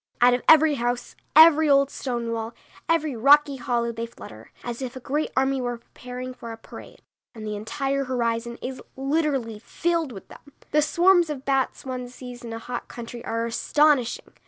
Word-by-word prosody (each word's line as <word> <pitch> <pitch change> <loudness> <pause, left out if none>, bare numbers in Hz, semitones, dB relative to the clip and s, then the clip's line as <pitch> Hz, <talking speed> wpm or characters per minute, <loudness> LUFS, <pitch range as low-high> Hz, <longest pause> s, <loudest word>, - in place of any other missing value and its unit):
Out 245 +1 +6
of 245 - 0
every 315 -1 +7
house, 245 0 -2 0.2
every 315 -1 +8
old 275 0 +4
stone 235 -3 -3
wall, 225 0 -4 0.3
every 310 -4 +1
rocky 280 +4 +5
hollow 235 -1 -1
they 230 0 -5
flutter, 110 - -13
as 240 +1 -5
if 260 0 -5
a - - -6
great 290 +5 -2
army 265 0 +2
were 245 -1 -3
preparing 250 +2 -8
for 235 -2 -9
a 225 - -8
parade, - - -13 0.3
and 220 -1 -8
the 210 0 -3
entire 275 +6 -2
horizon 235 -2 -2
is 255 0 -5
literally 270 -5 -1
filled 330 +4 -1
with 195 -5 -10
them. 285 - -16 0.2
The 300 - +4
swarms 345 +2 +4
of 275 -3 -5
bats 270 -1 0
one 250 -1 -5
sees 245 -1 -10
in 235 - -7
a 225 - -4
hot 240 +2 -6
country 235 0 -8
are 230 0 -2
astonishing. 270 +2 +1
250 Hz, 180 wpm, -24 LUFS, 235-285 Hz, 0.3 s, every